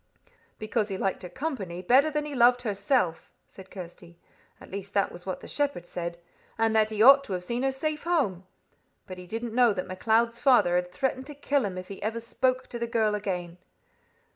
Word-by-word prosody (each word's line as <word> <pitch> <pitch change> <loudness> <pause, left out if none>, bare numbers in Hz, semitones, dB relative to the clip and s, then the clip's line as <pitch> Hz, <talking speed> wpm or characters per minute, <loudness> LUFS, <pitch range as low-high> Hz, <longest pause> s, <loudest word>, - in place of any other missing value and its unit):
"Because 215 0 -1
he 195 - -3
liked 195 0 -1
her 180 - -7
company 190 - -4
better 265 +10 +5
than 300 -1 -2
he 300 - -6
loved 245 -1 +4
herself," 205 - 0 0.2
said 190 -1 -14
Kirsty. 175 -2 -11 0.4
"At - - -14
least 200 +1 -7
that 200 - +2
was 175 +2 -12
what 185 - -4
the - - -10
shepherd 285 -12 -1
said, 170 -1 -5 0.4
and 225 0 +2
that 215 -1 +4
he 215 0 +1
ought 275 +2 +9
to 200 - -5
have 180 -1 -3
seen 235 +6 -2
her 270 0 +1
safe 300 +3 -3
home. 250 - 0 0.6
But 185 -1 -9
he 180 - -10
didn't 225 +3 -4
know 240 -2 +4
that 185 -2 -3
MacLeod's 225 +5 +1
father 250 -10 +4
had 180 0 0
threatened 260 +6 -2
to 295 - -8
kill 285 -2 0
him 185 -2 -4
if 185 +1 -7
ever 215 +3 -3
he 230 - -7
spoke 255 +1 0
to 235 - -6
the 235 - -2
girl 220 -2 +1
again." 180 -4 -4
220 Hz, 210 wpm, -27 LUFS, 185-255 Hz, 0.6 s, ought